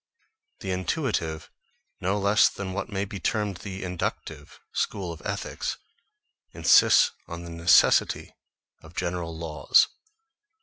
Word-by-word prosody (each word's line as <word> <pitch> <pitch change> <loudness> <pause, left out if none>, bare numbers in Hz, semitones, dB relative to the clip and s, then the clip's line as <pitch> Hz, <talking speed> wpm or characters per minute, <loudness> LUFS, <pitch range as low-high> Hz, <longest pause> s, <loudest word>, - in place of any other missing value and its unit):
The 95 - -3
intuitive, 90 - -2 0.5
no 95 +3 0
less 100 +2 +4
than 95 -2 -6
what 100 - -4
may 100 -2 -2
be 100 0 -7
termed 105 0 -1
the 95 0 -7
inductive, 90 -1 -5
school 95 -4 -2
of 80 - -12
ethics, 100 -1 -4 0.8
insists 485 - +5 0.2
on 85 0 -7
the 85 - -8
necessity 85 +1 +3 0.5
of 80 +1 -15
general 85 -2 -3
laws. 75 -4 +3
95 Hz, 120 wpm, -26 LUFS, 85-100 Hz, 0.8 s, insists